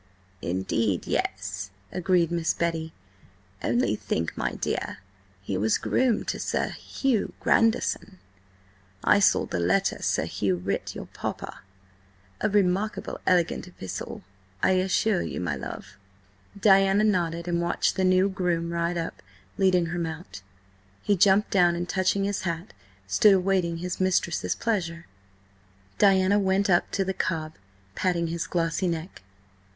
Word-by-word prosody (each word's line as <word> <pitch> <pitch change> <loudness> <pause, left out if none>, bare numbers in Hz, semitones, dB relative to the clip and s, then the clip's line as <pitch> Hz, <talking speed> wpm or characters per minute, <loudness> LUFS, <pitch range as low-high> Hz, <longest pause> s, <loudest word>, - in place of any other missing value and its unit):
"Indeed, 95 +2 -1
yes," 100 +1 -2 0.2
agreed 180 -2 +1
Miss 170 -1 0
Betty. 165 -1 -2 0.7
"Only 115 -3 +1
think, 80 -5 -3
my - - -2
dear, - - -3 0.5
he 95 -1 -2
was 110 +2 +2
groom 250 -4 +1
to - - -3
Sir - - -1
Hugh 260 -7 -1
Grandison–I 95 - -1
saw 200 - +4
the 85 - -3
letter 95 +3 +1
Sir - - 0
Hugh 95 -3 0
writ 90 +3 -3
your - - -6
Papa–a 95 - -7
remarkable 200 +1 0
elegant 180 0 +2
epistle, 95 - -7 0.4
I - - +4
assure 185 +1 +2
you, - - -4
my 90 -5 -1
love." 65 - -8 0.6
Diana 195 0 +5
nodded 170 -5 0
and 170 -1 0
watched 170 0 0
the 190 - 0
new 185 +1 +4
groom 175 -4 -1
ride 170 +1 -1
up, 165 -1 -4 0.4
leading 185 -2 +4
her 175 - -2
mount. 160 - -6 0.6
He 205 - +3
jumped 200 +2 +4
down, 175 -3 +4
and, 175 +1 -3
touching 190 +1 +1
his 200 0 -1
hat, 170 +1 -4 0.3
stood 150 - +5
awaiting 185 -3 +1
his 180 +2 -4
mistress's 185 -2 +1
pleasure. 175 -7 -2 0.9
Diana 195 0 +5
went 195 0 +2
up 175 - +3
to 195 - +1
the 190 - -1
cob, 160 -4 -2 0.4
patting 170 - 0
his 170 0 -3
glossy 170 +2 0
neck. 170 +1 -4
170 Hz, 135 wpm, -26 LUFS, -, 0.9 s, Diana